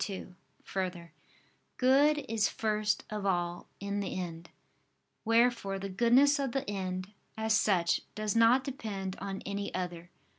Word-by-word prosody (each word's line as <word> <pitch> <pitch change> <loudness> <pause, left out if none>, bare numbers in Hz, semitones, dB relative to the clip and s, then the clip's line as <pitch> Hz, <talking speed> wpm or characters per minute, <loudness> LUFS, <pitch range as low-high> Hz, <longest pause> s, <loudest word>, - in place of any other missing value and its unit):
2: 190 -2 -6 0.3
Further, 180 -3 -4 0.7
good 285 +4 +4
is 220 -1 +1
first 215 -1 0
of 210 -1 -3
all 175 -2 -1
in 200 +1 -2
the 195 -2 -3
end: 170 -2 -6 0.8
wherefore 230 -3 +2
the 195 +1 -5
goodness 245 +8 +4
of 270 -4 -1
the 270 0 -2
end, 185 -1 -3 0.3
as 220 0 +1
such, 180 -5 +2
does 215 -1 -1
not 230 +3 +5
depend 205 -9 -4
on 195 0 -5
any 200 0 -3
other. 175 -2 -4
200 Hz, 140 wpm, -31 LUFS, 185-230 Hz, 0.8 s, not